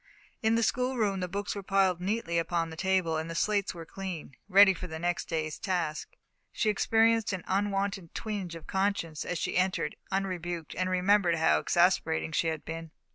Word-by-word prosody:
In 220 Hz, -1 st, +3 dB
the 230 Hz, -, +2 dB
schoolroom 240 Hz, -6 st, +1 dB
the 180 Hz, -, -2 dB
books 200 Hz, +3 st, -3 dB
were 200 Hz, -, -5 dB
piled 190 Hz, -2 st, +2 dB
neatly 185 Hz, -3 st, 0 dB
upon 165 Hz, -1 st, -1 dB
the -, -, -7 dB
table, 185 Hz, -2 st, +1 dB
and 160 Hz, +1 st, -3 dB
the 165 Hz, -, -5 dB
slates 200 Hz, +1 st, 0 dB
were 165 Hz, -1 st, -8 dB
clean 180 Hz, -7 st, -7 dB
ready 200 Hz, 0 st, +8 dB
for 180 Hz, 0 st, -7 dB
the 160 Hz, -2 st, -6 dB
next 175 Hz, +1 st, -1 dB
day's 155 Hz, -2 st, -3 dB
task. 175 Hz, -6 st, -2 dB, 0.4 s
She 215 Hz, -, +1 dB
experienced 225 Hz, +1 st, +3 dB
an 185 Hz, -, -4 dB
unwonted 195 Hz, -2 st, -1 dB
twinge 200 Hz, -6 st, -4 dB
of 165 Hz, -, -10 dB
conscience 190 Hz, -5 st, -1 dB
as 180 Hz, -, -2 dB
she -, -, -2 dB
entered, 180 Hz, -4 st, 0 dB, 0.2 s
unrebuked, 175 Hz, -4 st, -3 dB
and 185 Hz, 0 st, -1 dB
remembered 185 Hz, -1 st, +3 dB
how 155 Hz, -, +3 dB
exasperating 80 Hz, +1 st, +2 dB
she 165 Hz, -, +1 dB
had 160 Hz, -2 st, -3 dB
been. 165 Hz, 0 st, -6 dB
185 Hz, 185 wpm, -29 LUFS, 165-200 Hz, 0.4 s, ready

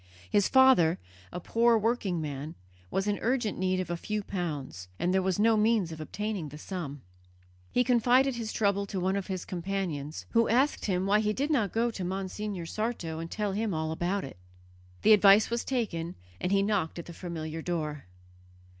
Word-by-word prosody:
His 205 Hz, -2 st, +4 dB
father, 260 Hz, -12 st, +5 dB, 0.3 s
a -, -, -5 dB
poor 230 Hz, +5 st, +3 dB
working 215 Hz, -5 st, 0 dB
man, 150 Hz, 0 st, -5 dB, 0.3 s
was 195 Hz, -, -1 dB
in 205 Hz, -1 st, 0 dB
urgent 240 Hz, -4 st, 0 dB
need 185 Hz, 0 st, +1 dB
of 180 Hz, -2 st, -3 dB
a -, -, 0 dB
few 210 Hz, +4 st, -3 dB
pounds, 150 Hz, -, -4 dB
and 180 Hz, -, 0 dB
there 190 Hz, -, +3 dB
was 185 Hz, -1 st, 0 dB
no 225 Hz, +2 st, +4 dB
means 215 Hz, -5 st, +2 dB
of 160 Hz, -1 st, -7 dB
obtaining 205 Hz, -1 st, -4 dB
the 150 Hz, -, -10 dB
sum. 150 Hz, -5 st, -6 dB, 0.7 s
He 250 Hz, -, +3 dB
confided 250 Hz, +2 st, +4 dB
his 230 Hz, -2 st, -4 dB
trouble 200 Hz, -1 st, +1 dB
to 195 Hz, -, -3 dB
one 190 Hz, +2 st, 0 dB
of 200 Hz, -2 st, -3 dB
his 185 Hz, -2 st, -4 dB
companions, 175 Hz, -5 st, -4 dB
who 230 Hz, 0 st, +3 dB
asked 260 Hz, +6 st, +2 dB
him 185 Hz, -2 st, 0 dB
why 205 Hz, +2 st, +4 dB
he 210 Hz, 0 st, +1 dB
did 285 Hz, +7 st, -1 dB
not 220 Hz, -, +1 dB
go 235 Hz, +1 st, +1 dB
to 195 Hz, -, -5 dB
Monsignor 190 Hz, 0 st, -4 dB
Sarto 175 Hz, -5 st, -3 dB
and 165 Hz, 0 st, -5 dB
tell 210 Hz, +1 st, -2 dB
him 205 Hz, -1 st, -1 dB
all 160 Hz, 0 st, -2 dB
about 180 Hz, +4 st, -1 dB
it. 135 Hz, -, -9 dB, 0.7 s
The 220 Hz, -, +7 dB
advice 205 Hz, +1 st, +6 dB
was 235 Hz, 0 st, 0 dB
taken, 185 Hz, -10 st, -2 dB, 0.2 s
and 180 Hz, -, -1 dB
he 195 Hz, 0 st, +3 dB
knocked 200 Hz, -6 st, 0 dB
at 170 Hz, -, -6 dB
the 170 Hz, -, -9 dB
familiar 165 Hz, -2 st, -5 dB
door. 155 Hz, -4 st, -3 dB
195 Hz, 190 wpm, -29 LUFS, 170-220 Hz, 0.7 s, The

